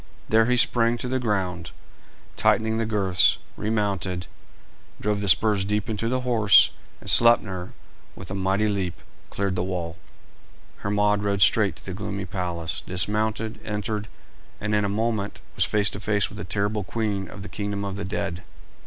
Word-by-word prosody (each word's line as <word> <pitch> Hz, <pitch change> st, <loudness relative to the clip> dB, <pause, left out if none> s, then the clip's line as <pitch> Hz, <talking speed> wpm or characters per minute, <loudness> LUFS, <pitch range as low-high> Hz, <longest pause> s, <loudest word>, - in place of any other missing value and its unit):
There 110 Hz, +1 st, +4 dB
he 125 Hz, 0 st, +2 dB
sprang 120 Hz, -1 st, +3 dB
to 125 Hz, -, -4 dB
the 130 Hz, +1 st, 0 dB
ground, 95 Hz, -7 st, -2 dB, 0.7 s
tightened 110 Hz, 0 st, +2 dB
the 115 Hz, -, -1 dB
girths, 95 Hz, -5 st, +2 dB, 0.2 s
remounted, 100 Hz, -4 st, -1 dB, 0.7 s
drove 105 Hz, -1 st, -1 dB
the 100 Hz, -, +1 dB
spurs 105 Hz, +2 st, +4 dB
deep 105 Hz, +2 st, -1 dB
into 110 Hz, +2 st, -1 dB
the 130 Hz, +1 st, 0 dB
horse, 115 Hz, -6 st, +5 dB, 0.3 s
and -, -, -14 dB
Sleipner, 100 Hz, -6 st, +4 dB, 0.4 s
with -, -, -9 dB
a -, -, -2 dB
mighty 95 Hz, +2 st, +1 dB
leap, 95 Hz, -4 st, -2 dB, 0.3 s
cleared 100 Hz, -2 st, -2 dB
the 90 Hz, -, -1 dB
wall. 90 Hz, -3 st, -3 dB, 0.8 s
Hermod 105 Hz, 0 st, +1 dB
rode 100 Hz, -2 st, +2 dB
straight 105 Hz, -2 st, +3 dB
to -, -, -16 dB
the 95 Hz, -, -5 dB
gloomy 100 Hz, 0 st, -4 dB
palace, 85 Hz, -2 st, -4 dB
dismounted, 110 Hz, +4 st, 0 dB
entered, 105 Hz, 0 st, -3 dB, 0.5 s
and 105 Hz, +1 st, -2 dB
in 105 Hz, 0 st, +2 dB
a -, -, -1 dB
moment 110 Hz, -1 st, -1 dB, 0.2 s
was -, -, +3 dB
face 105 Hz, -1 st, +1 dB
to 100 Hz, -, -6 dB
face 105 Hz, 0 st, 0 dB
with 105 Hz, -, -10 dB
the -, -, -5 dB
terrible 100 Hz, +3 st, -1 dB
queen 100 Hz, -1 st, -2 dB
of 95 Hz, -, -9 dB
the -, -, -7 dB
kingdom 100 Hz, -1 st, -4 dB
of 100 Hz, -1 st, -4 dB
the 100 Hz, -, -4 dB
dead. 90 Hz, -1 st, -3 dB
100 Hz, 170 wpm, -25 LUFS, 95-110 Hz, 0.8 s, horse